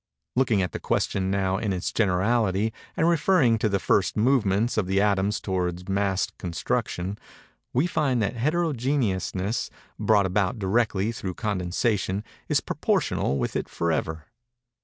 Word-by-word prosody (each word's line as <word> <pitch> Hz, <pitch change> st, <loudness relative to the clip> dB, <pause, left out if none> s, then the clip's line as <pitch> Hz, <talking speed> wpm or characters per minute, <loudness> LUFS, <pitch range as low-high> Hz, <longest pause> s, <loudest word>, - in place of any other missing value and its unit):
Looking 120 Hz, -6 st, +3 dB
at 90 Hz, -, -3 dB
the -, -, -5 dB
question, 95 Hz, -1 st, 0 dB
now, 95 Hz, -1 st, 0 dB
in 105 Hz, -, -1 dB
its 90 Hz, -1 st, -2 dB
generality, 105 Hz, +1 st, +1 dB, 0.2 s
and 165 Hz, -, +3 dB
referring 155 Hz, -, +3 dB
to 110 Hz, -, +1 dB
the 100 Hz, -, +1 dB
first 95 Hz, 0 st, +1 dB
movements 115 Hz, -2 st, +2 dB
of 105 Hz, -4 st, 0 dB
the 95 Hz, +1 st, +2 dB
atoms 100 Hz, 0 st, +2 dB
towards 90 Hz, -2 st, -2 dB
mass 100 Hz, -1 st, +1 dB
constitution, 90 Hz, +2 st, -2 dB, 0.5 s
we 130 Hz, +6 st, +2 dB
find 145 Hz, -7 st, +1 dB
that 105 Hz, +2 st, -1 dB
heterogeneousness, 125 Hz, -, 0 dB, 0.3 s
brought 105 Hz, -3 st, +3 dB
about 100 Hz, +5 st, 0 dB
directly 105 Hz, 0 st, +1 dB
through 95 Hz, -6 st, -5 dB
condensation, 100 Hz, 0 st, -1 dB, 0.3 s
is -, -, +3 dB
proportional 70 Hz, -, 0 dB
with -, -, -2 dB
it -, -, -2 dB
forever. 80 Hz, -1 st, -2 dB
100 Hz, 140 wpm, -25 LUFS, 95-115 Hz, 0.5 s, Looking